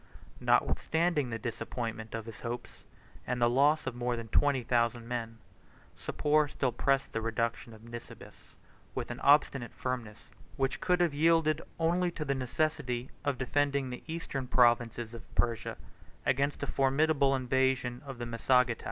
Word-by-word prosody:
Notwithstanding 160 -5 +2
the 115 - -3
disappointment 115 0 -4
of 115 -1 -5
his 115 -2 -9
hopes, 120 +1 -6 0.4
and 125 0 -1
the 120 - +4
loss 140 +6 +3
of 130 - -2
more 120 0 -1
than 115 -1 -7
twenty 140 +1 +3
thousand 115 0 +1
men, 115 -2 -4 0.6
Sapor 150 0 +1
still 135 -3 -1
pressed 135 +3 +1
the 115 - -1
reduction 115 +1 -2
of 110 0 -14
Nisibis, 120 0 -11 0.4
with - - -3
an - - -6
obstinate 140 -4 +3
firmness, 115 -4 -5 0.3
which 135 -1 0
could 180 -1 +2
have 170 -4 +2
yielded 160 0 +3 0.2
only 175 +2 +2
to 155 - -4
the 140 - +1
necessity 130 -1 -1
of 145 -2 0
defending 140 +1 0
the 125 - -6
eastern 160 -5 -4
provinces 120 -2 +3
of 115 - -8
Persia 115 -2 0 0.5
against 140 +2 +1
a - - +1
formidable 140 0 +2
invasion 130 -1 +1
of 135 -3 -8
the 120 - -4
Massagetæ. 120 +1 +2
125 Hz, 150 wpm, -31 LUFS, 120-145 Hz, 0.6 s, the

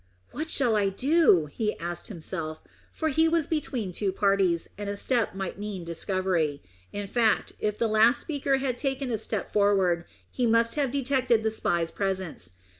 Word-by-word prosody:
"What 315 +2 -4
shall 245 -8 +3
I 200 -2 +2
do?" 255 - +4
he 210 +9 -3
asked 170 0 -5
himself, 160 -4 -5 0.3
for 315 - -1
he 320 +3 +3
was 325 -1 +2
between 255 - -2
two 195 +1 -1
parties, 195 -3 +2
and 205 0 -5
a 200 - -3
step 235 -4 0
might 195 0 -4
mean 205 -3 -5
discovery. 170 - -1 0.3
In 205 0 -4
fact, 225 +2 +1
if 210 0 -1
the 235 - +1
last 220 +3 +4
speaker 280 -3 0
had 260 -2 -2
taken 270 -2 -2
a 225 - 0
step 215 -2 -4
forward, 190 -4 +2 0.3
he 250 -2 0
must 230 0 +3
have 285 -3 0
detected 255 -4 +1
the 220 - +1
spy's 170 -6 0
presence. 190 - -3
210 Hz, 175 wpm, -27 LUFS, 185-255 Hz, 0.3 s, do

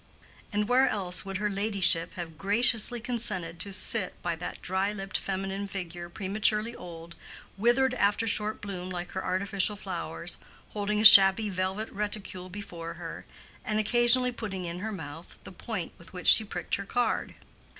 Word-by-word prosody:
And 210 0 -1
where 255 +2 +4
else 185 -3 -1
would 195 -1 -4
her 210 +2 -1
ladyship 195 -4 +1
have 170 -3 -7
graciously 225 +6 +1
consented 210 -9 -2
to 200 - 0
sit 190 +1 -1
by 170 -1 -1
that 175 - -6
dry 190 +2 -1
lipped 195 -2 -7
feminine 195 +1 -4
figure 175 -3 -7
prematurely 210 +4 -1
old, 170 -1 -10 0.4
withered 245 +5 +2
after 205 -2 +1
short 215 -1 -1
bloom 185 -3 -6
like 175 -1 -6
her 190 - -4
artificial 200 +2 0
flowers, 205 - -3 0.3
holding 210 0 -2
a 215 - +2
shabby 205 0 +10
velvet 190 +4 -3
reticule 195 -3 -4
before 175 -4 -8
her, - - -9 0.4
and 215 - -2
occasionally 240 +3 +4
putting 195 -6 -6
in 170 +1 -5
her 220 +3 -4
mouth 160 -3 -9
the - - -10
point 185 -1 -6
with 170 +2 -15
which 180 -2 -5
she 220 - +8
pricked 180 -4 -7
her 200 - -7
card? 245 +3 -1
195 Hz, 160 wpm, -28 LUFS, 180-215 Hz, 0.4 s, shabby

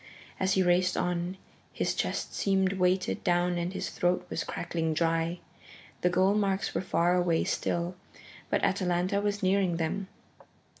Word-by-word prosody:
As 190 0 +2
he 190 - +3
raced 180 +1 +2
on, 175 +1 -1 0.4
his - - 0
chest - - -2
seemed 190 -1 +1
weighted 185 0 +1
down 175 0 +2
and 170 +1 -2
his 190 - -4
throat 180 0 0
was - - -1
crackling 160 -2 -2
dry. 165 +1 +1 0.6
The 180 - +3
goal 185 +2 +3
marks 200 -2 0
were - - 0
far 175 -1 +2
away 175 -2 +2
still, 175 +1 -1 0.6
but - - 0
Atalanta 185 +1 +1
was 205 0 -1
nearing 185 -2 +2
them. 180 +4 -2
180 Hz, 150 wpm, -29 LUFS, 175-190 Hz, 0.6 s, he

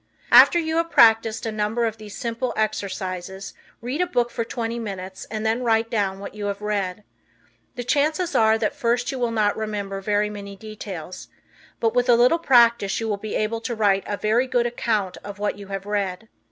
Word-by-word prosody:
After - - +8
you 320 -1 0
have 335 0 +1
practiced 225 -3 +4
a 225 - -2
number 215 +2 0
of 225 -1 -3
these 210 -2 -10
simple 235 0 -3
exercises 190 -3 -3 0.3
read 260 +8 -2
a 360 - +1
book 240 -8 0
for 230 - -2
twenty 230 0 -4
minutes 190 -3 -6
and 215 0 -4
then 225 +3 +1
write 225 -1 +1
down 200 -3 0
what 200 - -8
you 205 -1 -4
have 200 0 -3
read. 210 -2 -2 0.7
The 245 - -4
chances 310 +7 +1
are 220 0 +4
that 225 - -1
at - - -1
first 245 -2 0
you 265 - -5
will 240 -1 +1
not 215 -2 +1
remember 205 -3 -4
very 210 +1 0
many 200 -1 -8
details, 195 -5 -8 0.5
but 225 -1 +1
with 245 0 +1
a 240 - +7
little 250 +8 +4
practice 235 -8 +4
you 225 - -3
will 210 -2 -1
be 215 +1 -5
able 225 +1 -1
to 235 +1 -3
write 200 -3 +2
a 205 - -2
very 225 +5 +1
good 245 -1 +1
account 215 -5 -1
of 205 0 -8
what 205 0 -2
you 200 - -9
have 195 0 -5
read. 205 0 -2
220 Hz, 205 wpm, -23 LUFS, 205-235 Hz, 0.7 s, After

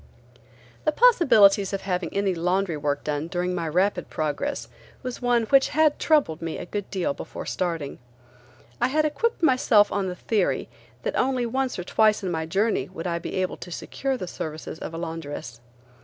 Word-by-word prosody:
The 305 - +3
possibilities 230 - +5
of 195 - -2
having 180 -3 -2
any 200 -1 +1
laundry 180 +1 0
work 145 -1 -2
done 150 +1 -2
during 180 0 -1
my 170 -2 -2
rapid 180 +2 +1
progress 160 - -2 0.4
was 255 0 -5
one 245 -1 +2
which 270 +4 +4
had 310 -1 +3
troubled 285 - +2
me 165 -1 -3
a - - -6
good 205 +2 -5
deal 180 -7 -1
before - - -7
starting. 165 -6 -3 0.8
I - - +4
had 305 +4 +2
equipped 345 +7 -1
myself 255 -7 +4
on 200 -2 0
the 180 - -4
theory 185 - 0 0.3
that - - -2
only 255 -1 +1
once 260 +2 -1
or 180 - -3
twice 215 +3 +3
in 185 - -1
my 160 -1 -2
journey 200 +6 0
would 185 -2 -7
I 170 -1 -1
be - - -6
able 185 -1 -1
to 175 - -9
secure 265 +9 -3
the 185 - -4
services 155 -1 -6
of 165 - -6
a - - -4
laundress. 155 -8 -6
190 Hz, 185 wpm, -25 LUFS, 165-245 Hz, 0.8 s, possibilities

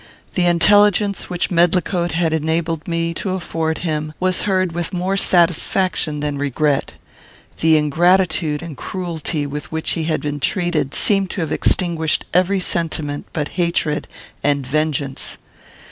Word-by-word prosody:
The 180 -2 +2
intelligence 205 +3 +4
which 180 0 -2
Medlicote 175 0 +2
had 165 -1 +1
enabled 160 0 -1
me 170 -1 -1
to 185 +2 -3
afford 160 -3 -2
him 155 -1 -2
was 185 0 +1
heard 185 -2 +1
with 170 +2 -4
more 185 +2 -1
satisfaction 175 -3 +1
than 145 -1 -2
regret. 145 0 0 0.6
The 160 -1 +5
ingratitude 160 0 +2
and 165 -4 -7
cruelty 165 -2 -3
with 145 -2 -6
which 160 0 -1
he 165 -2 -1
had 155 -1 0
been 145 0 -3
treated 165 -3 -1
seemed 195 -2 +2
to 190 - -3
have 160 -2 -3
extinguished 165 -4 +1
every 185 +2 +3
sentiment 160 -5 -1
but 150 -3 -3
hatred 170 -4 -1 0.4
and 140 -2 +1
vengeance. 145 -1 -2
165 Hz, 140 wpm, -19 LUFS, 150-180 Hz, 0.6 s, The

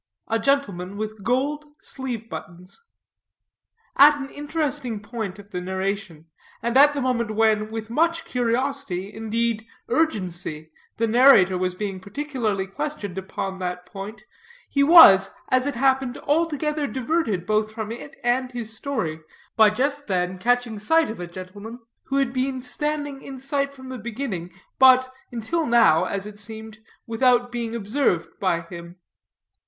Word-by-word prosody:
A 225 0 +1
GENTLEMAN 205 -8 0
WITH 215 -1 -5
GOLD 290 +5 -1
SLEEVE 245 -4 -5
BUTTONS. 175 - -10 1.2
At 290 +2 +8
an 275 -1 -6
interesting 290 -6 -2
point 210 -2 -5
of 205 0 -14
the 180 - -3
narration, 190 -3 -3 0.4
and 235 +1 -1
at 290 +2 +7
the 280 - -1
moment 235 -4 -1
when, 215 -1 +2
with 225 0 -6
much 330 +5 +1
curiosity, 245 -5 -2
indeed, 225 +1 -1 0.2
urgency, 175 - -1 0.3
the 230 - +2
narrator 225 -5 +6
was 180 0 -1
being 195 -1 -4
particularly 220 -2 -2
questioned 200 -1 -5
upon 190 0 -5
that 180 -1 -4
point, 195 +3 -8 0.4
he 280 - 0
was, 280 - +9 0.2
as 255 +1 +2
it 285 - -2
happened, 265 0 +1
altogether 300 -1 0
diverted 255 - -1
both 215 +1 +1
from 220 -1 -5
it 280 +6 -8
and 250 +1 0
his 225 -2 -5
story, 170 - -3 0.3
by 220 -1 +7
just 280 +6 -1
then 180 -1 -1
catching 240 0 +1
sight 320 +7 +2
of 220 - -8
a 175 - -5
gentleman 190 +6 -9 0.3
who 270 - -3
had 270 -3 +1
been 260 0 -1
standing 290 0 -3
in 270 -1 -8
sight 275 +1 -1
from 260 -2 -12
the 255 -1 -6
beginning, 215 -6 -5 0.3
but, 255 0 +6 0.2
until 245 +9 -1
now, 230 -9 +5
as 200 0 -3
it 210 0 -10
seemed, 220 0 -7 0.3
without 245 +1 +2
being 235 -1 -3
observed 215 - -1
by 180 -3 +1
him. 170 0 -10
230 Hz, 150 wpm, -24 LUFS, 195-270 Hz, 1.2 s, was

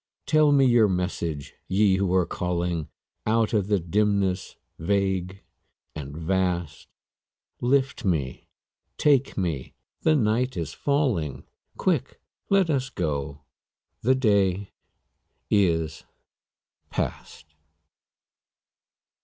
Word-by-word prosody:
Tell 155 -1 +4
me 140 -2 +5
your 120 -4 +5
message, 90 -6 -3
Ye 95 0 +3
who 95 -2 0
are 90 -2 +3
calling 85 -3 -2 0.4
Out 110 0 +2
of 100 -3 +1
the 105 -1 +3
dimness 100 +1 0 0.2
vague 95 +1 -1 0.5
and 75 0 -7
vast; 85 -2 -1 0.7
Lift 135 +1 +1
me, 75 - -1 0.5
take 140 -3 +2
me, 85 -9 -3 0.3
the 155 - +3
night 125 0 +1
is 80 -3 -3
falling; 115 - 0 0.3
Quick, - - 0 0.3
let 195 -2 +4
us 135 -2 0
go, 70 - -3 0.6
the 130 +3 +3
day 100 -6 +1 0.8
is 80 -6 +1 0.9
past. 75 -1 -5
95 Hz, 95 wpm, -25 LUFS, 85-120 Hz, 0.9 s, me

